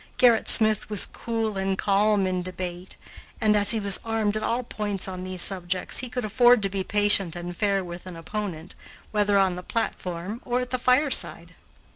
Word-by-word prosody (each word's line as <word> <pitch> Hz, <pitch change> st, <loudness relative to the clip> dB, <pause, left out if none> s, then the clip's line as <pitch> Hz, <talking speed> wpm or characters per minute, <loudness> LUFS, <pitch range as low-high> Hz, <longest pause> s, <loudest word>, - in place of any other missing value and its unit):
Gerrit 240 Hz, -3 st, +4 dB
Smith 215 Hz, -2 st, +3 dB
was 210 Hz, -3 st, +2 dB
cool 225 Hz, -3 st, -4 dB
and 195 Hz, 0 st, -1 dB
calm 200 Hz, 0 st, +2 dB
in 185 Hz, -1 st, -1 dB
debate, 180 Hz, 0 st, -7 dB, 0.4 s
and, 215 Hz, -1 st, +2 dB
as 205 Hz, -1 st, +2 dB
he 225 Hz, 0 st, +4 dB
was 200 Hz, -2 st, +6 dB
armed 220 Hz, -2 st, -1 dB
at 215 Hz, -, -2 dB
all 235 Hz, +3 st, -1 dB
points 205 Hz, -4 st, -4 dB
on 185 Hz, -1 st, -6 dB
these 185 Hz, -1 st, -3 dB
subjects, 185 Hz, -1 st, -1 dB
he 255 Hz, -, -4 dB
could 250 Hz, -2 st, -4 dB
afford 240 Hz, +1 st, +4 dB
to 195 Hz, -, +2 dB
be 195 Hz, 0 st, -3 dB
patient 205 Hz, -4 st, +2 dB
and 175 Hz, 0 st, -7 dB
fair 200 Hz, 0 st, 0 dB
with 175 Hz, +1 st, -9 dB
an 180 Hz, -, -7 dB
opponent, 170 Hz, -1 st, -6 dB, 0.4 s
whether 205 Hz, -1 st, +2 dB
on 190 Hz, -2 st, +2 dB
the -, -, -6 dB
platform 185 Hz, 0 st, -4 dB
or 245 Hz, 0 st, -1 dB
at 250 Hz, -, -6 dB
the 255 Hz, -, -1 dB
fireside. 255 Hz, +4 st, +2 dB
205 Hz, 190 wpm, -25 LUFS, 185-220 Hz, 0.4 s, was